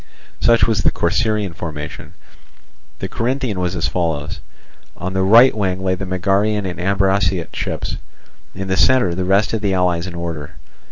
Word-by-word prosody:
Such 115 0 +4
was 110 -2 +1
the - - +4
Corcyraean 105 +2 0
formation. 80 -3 -7 0.8
The - - -4
Corinthian 125 -4 -2
was 90 0 -1
as 85 - 0
follows: 80 -3 -2 0.6
on 95 +1 -4
the 95 - 0
right 115 +7 +6
wing 95 -3 -1
lay 95 -1 +1
the 95 +1 -4
Megarian 100 +3 +1
and 90 - -6
Ambraciot 95 -2 +1
ships, - - -3 0.6
in 95 0 -5
the 95 - 0
centre 125 -8 +4
the 90 +1 -2
rest 100 +4 +2
of 110 - -1
the 100 -3 0
allies 90 -1 +1
in 90 - -7
order. 85 -4 -5
95 Hz, 165 wpm, -19 LUFS, 85-105 Hz, 0.8 s, right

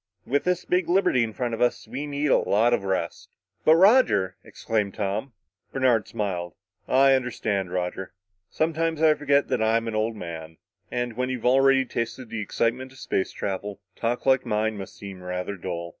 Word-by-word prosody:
With 145 +3 0
this 180 0 0
big 180 -2 +1
liberty 175 -9 +3
in 115 - -3
front 120 +1 -3
of 115 - -4
us, 120 -2 +1
we 135 +6 -5
need 145 0 -1
a - - +5
lot 115 +4 +2
of 120 - +1
rest." 95 -1 -3 0.3
"But, 160 - +6
Roger!" 185 - +4
exclaimed 105 -3 -2
Tom. 105 +5 -3 0.4
Bernard 125 -5 +2
smiled. 90 -6 -3 0.3
"I 135 +1 +5
understand, 110 -7 -1
Roger. 90 +1 -3 0.4
Sometimes 160 0 -1
I 155 -1 +7
forget 145 -1 +2
that - - 0
I'm 115 +1 +2
an 115 - -3
old 110 +1 0
man. 80 -4 -8 0.3
And 120 -2 -3
when 125 +1 -1
you've 125 -3 -4
already 135 +1 +4
tasted 115 0 -4
the 115 - -3
excitement 120 +5 -1
of 130 - -17
space 95 - -2
travel, 100 0 -4 0.2
talk 120 +1 -2
like 130 -1 +4
mine 110 -1 0
must 100 -2 -8
seem 100 -2 -9
rather 90 +2 -4
dull." 85 -2 -5
115 Hz, 180 wpm, -25 LUFS, 100-135 Hz, 0.4 s, I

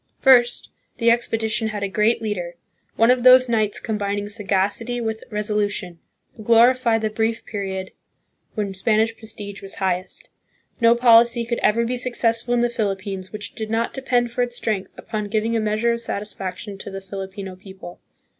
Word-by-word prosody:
First. 245 -3 +4 0.3
The 230 -1 +4
expedition 225 -1 0
had 210 -2 -4
a - - 0
great 215 +4 +1
leader, 180 -5 -3 0.4
one 230 +2 +5
of 250 -1 +2
those 255 +1 +7
knights 215 -3 +1
combining 205 -2 -3
sagacity 205 +3 -1
with 220 -1 -3
resolution, 205 -4 -2 0.4
who 220 - -11
glorify 235 +1 +4
the 215 -1 -2
brief 225 +1 -1
period 190 -2 -4 0.6
when 205 -3 -2
Spanish 220 +3 +1
prestige 210 -2 -5
was 195 - -7
highest. 185 -1 -2 0.5
No 230 -1 +5
policy 235 0 +5
could 235 0 -2
ever 230 +2 +2
be 250 +2 -2
successful 240 -1 0
in 240 - +2
the 240 - +3
Philippines 195 -4 -3
which 210 0 -5
did 220 -2 -5
not 225 +1 -1
depend 245 -3 0
for 245 - -2
its 245 0 -1
strength 210 -5 -2
upon 210 -1 -4
giving 220 +2 0
a - - +2
measure 215 +2 +1
of 235 0 -2
satisfaction 200 -2 -5
to - - -7
the 195 0 -6
Filipino 190 0 -7
people. 190 -2 -12
220 Hz, 165 wpm, -22 LUFS, 200-235 Hz, 0.6 s, those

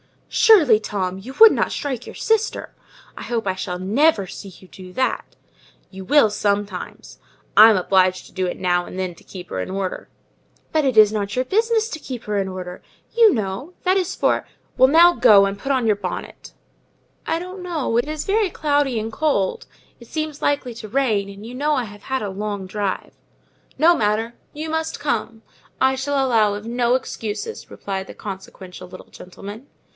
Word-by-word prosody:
"Surely, 325 - +6
Tom, 190 -3 -3
you 255 +7 -10
would 450 0 +10
not - - 0
strike 265 -5 -4
your - - -9
sister! 445 -1 -1 0.4
I - - -7
hope 230 -3 -2
I 190 - 0
shall 185 -1 -4
never 210 - +2
see 195 +2 -9
you 185 0 -14
do 185 -1 -12
that." 260 +4 -2 0.6
"You 190 -1 -9
will 285 0 +5
sometimes: 205 -2 -3 0.4
I'm 220 0 +9
obliged 185 0 +2
to - - -16
do 185 -1 -2
it - - -4
now 175 -1 0
and 185 - -9
then 185 -2 -3
to - - -20
keep 180 -2 -10
her 95 - -4
in 95 - -4
order." 190 -1 -4 0.6
"But 310 -2 +1
it 260 -4 0
is 215 -1 +8
not 205 -1 -3
your 255 - +1
business 445 - +1
to 315 - -6
keep 250 -5 -7
her 210 -1 -2
in 195 -1 0
order, 185 -1 -7 0.3
you 455 -4 +6
know—that 265 - -2
is 375 -1 -1
for—" - - 0 0.3
"Well, 260 - +7
now 335 +5 +6
go 200 -10 +6
and 195 +1 -3
put 275 - -3
on 260 -3 +1
your 210 -2 +2
bonnet." 185 -3 -7 0.7
"I 325 - +1
don't 365 +2 -7
know—it 300 -9 -1
is 305 0 -4
so 395 - -2
very 430 -3 +2
cloudy 290 -7 0
and 220 +1 -4
cold, 220 -7 -1 0.3
it 235 - -14
seems 310 0 -4
likely 280 -4 0
to 220 -1 -8
rain;—and 210 -5 -1
you 235 - -8
know 295 +4 0
I 255 - 0
have 205 -2 -11
had 265 0 -2
a 205 - -3
long 200 0 -4
drive." 195 0 -3 0.6
"No 330 +5 +5
matter—you 230 +8 -3
must 320 0 -2
come; 225 -5 -2 0.4
I 265 0 +4
shall 270 +1 0
allow 220 -5 +2
of 205 +1 -8
no 240 +1 +1
excuses," 255 - -5
replied 190 -1 -5
the - - -11
consequential 190 -2 -9
little 185 +1 -12
gentleman. 205 +7 -11
225 Hz, 185 wpm, -21 LUFS, 195-290 Hz, 0.7 s, would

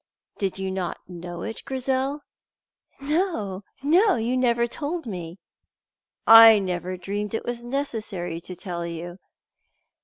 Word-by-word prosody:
"Did 195 -2 -1
you 190 0 -3
not 185 -2 -3
know 175 -1 -7
it, 225 - -5
Grizel?" 265 +2 -1 0.8
"No, 275 - -1 0.2
no; 365 +7 +4
you 235 +3 -1
never 235 -2 +2
told 300 +6 -4
me." 175 -5 -6 0.9
"I 225 -1 +10
never 185 -1 -3
dreamed 205 +4 -3
it - - -4
was 240 0 -4
necessary 220 -10 -4
to 180 +1 -8
tell 175 -1 -5
you." 170 +2 -6
215 Hz, 125 wpm, -25 LUFS, 180-260 Hz, 0.9 s, I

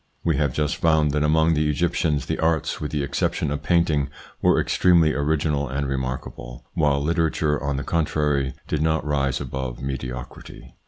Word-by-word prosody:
We 80 -4 +1
have 70 -2 +1
just 75 +2 -1
found 80 -2 +3
that 75 +1 0
among 80 +2 +3
the 75 -1 +1
Egyptians 75 -2 0
the - - -3
arts, 80 -1 0
with 75 - -3
the 75 -2 -2
exception 70 0 -1
of 75 - -3
painting, 80 -5 +2 0.3
were - - +4
extremely 85 -4 +3
original 75 -1 0
and 70 +2 -2
remarkable, 65 -2 -5
while 70 -3 +2
literature, 80 -2 +1
on 70 -1 -1
the 70 - -3
contrary, 75 -4 0
did 75 - -1
not 80 0 +1
rise 70 -3 0
above 65 -3 -5
mediocrity. 65 -2 -7
75 Hz, 165 wpm, -23 LUFS, 70-80 Hz, 0.3 s, were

